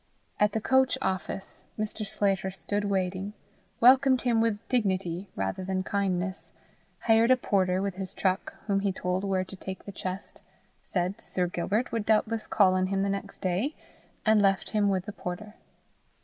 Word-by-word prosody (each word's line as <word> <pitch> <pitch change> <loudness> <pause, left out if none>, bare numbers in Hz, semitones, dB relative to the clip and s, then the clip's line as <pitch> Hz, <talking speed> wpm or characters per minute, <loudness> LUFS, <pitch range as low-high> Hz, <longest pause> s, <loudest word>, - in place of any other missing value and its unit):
At 210 0 +3
the 220 - +1
coach 260 +3 +3
office 190 +1 -3
Mr. 215 0 -3
Sclater 195 -2 0
stood 205 +2 -3
waiting, 190 0 -1 0.5
welcomed 260 +1 +6
him 235 -3 +3
with 225 -2 +2
dignity 190 -6 0
rather 95 - -2
than 185 0 -1
kindness, 190 -2 -1 0.5
hired 225 +1 +4
a 255 - +6
porter 190 -5 +1
with 195 -2 -3
his 190 -1 -6
truck 190 0 0
whom 200 -2 +1
he 200 0 +1
told 185 0 -2
where 190 -2 +1
to 195 - -9
take 190 0 -7
the 200 - -6
chest, 185 0 -6 0.4
said 185 +4 -2
Sir 180 - -1
Gilbert 195 +7 -1
would 225 -2 -2
doubtless 220 +1 +2
call 195 -3 +4
on 185 0 +2
him 195 0 0
the 200 - 0
next 195 0 -4
day, 195 - 0 0.5
and 215 -1 +5
left 195 -2 +2
him 210 -2 +2
with 190 -2 0
the 210 - -5
porter. 200 +4 -6
195 Hz, 170 wpm, -28 LUFS, 185-215 Hz, 0.5 s, welcomed